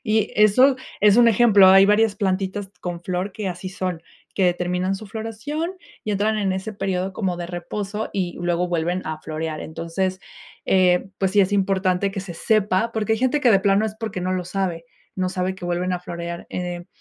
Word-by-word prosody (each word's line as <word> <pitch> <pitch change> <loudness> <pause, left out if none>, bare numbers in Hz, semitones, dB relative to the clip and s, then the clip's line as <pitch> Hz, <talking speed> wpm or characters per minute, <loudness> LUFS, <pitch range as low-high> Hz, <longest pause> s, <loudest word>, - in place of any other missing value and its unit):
y 215 -2 +1
eso 250 +6 +5 0.2
es 210 0 +6
un 240 -1 +7
ejemplo. 210 -4 +6
Hay 195 +1 +7
varias 210 +1 +3
plantitas 195 0 -2
con 175 -1 -5
flor 185 +1 -3
que 205 0 -4
así 180 +1 -5
son, 185 -3 -4 0.3
que 185 -3 +3
terminan 180 +2 -1
su 215 +2 -10
floración, 230 - -4 0.3
y 215 - -2
entran 210 +2 +1
en 200 -3 0
ese 190 +3 -4
período 190 -1 -2
como 185 -3 -1
de 175 - -4
reposo 200 +4 -4
y 180 -3 -2
luego 175 0 0
vuelven 175 +1 -1
a 155 0 -4
florear. 155 0 -4
Entonces, 185 +4 -3 0.5
eh, 185 -1 +3
pues 190 -1 +1
sí, 205 +1 +4
es 195 +1 +2
importante 195 -1 +1
que 195 0 -4
se 185 -2 -8
sepa, 215 +2 +1
porque 220 -1 0
hay 220 - +1
gente 260 +4 +1
que 250 - +4
de 195 -3 +5
plano 200 +2 +3
es 215 - -5
porque 220 -5 -4
no 185 +1 -1
lo 185 -1 -2
sabe. 180 -2 -3 0.3
No 185 -1 0
sabe 185 0 -2
que 190 - -10
vuelven 175 +1 -1
a 180 - -2
florear, 170 -1 -6
eh, 175 -1 -4
190 Hz, 200 wpm, -22 LUFS, 180-210 Hz, 0.5 s, un